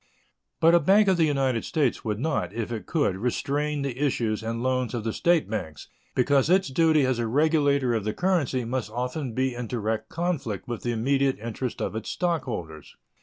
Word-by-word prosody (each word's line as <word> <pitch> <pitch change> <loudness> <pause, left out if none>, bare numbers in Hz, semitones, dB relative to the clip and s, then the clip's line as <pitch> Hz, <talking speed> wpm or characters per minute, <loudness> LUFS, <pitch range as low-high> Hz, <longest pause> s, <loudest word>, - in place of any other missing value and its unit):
But 165 +1 +5
a 175 - +7
bank 200 +4 +4
of 190 -2 +4
the 165 - +4
United 135 -5 0
States 145 -7 0
would 105 -2 -2
not, 135 - -1
if 115 0 -4
it 115 -2 -5
could, 145 - +1
restrain 140 +6 -1
the 135 -2 -4
issues 115 -6 0
and 115 +1 -3
loans 130 -1 0
of 115 - -3
the 110 -1 -2
State 170 -2 +2
banks, 90 -9 -5 0.3
because 135 +3 +3
its 190 -2 +3
duty 155 0 +3
as 130 -2 0
a 115 - 0
regulator 140 -1 +2
of 110 -3 -1
the 105 +1 -2
currency 160 -9 0
must 120 -1 -2
often 125 +3 -3
be 130 +1 0
in 120 -1 -5
direct 110 -1 -2
conflict 160 - -3
with 120 -2 -4
the 120 - -1
immediate 135 +4 +1
interest 115 +3 -4
of - - -3
its 110 0 -4
stockholders. 120 - -3
130 Hz, 195 wpm, -26 LUFS, 115-150 Hz, 0.3 s, a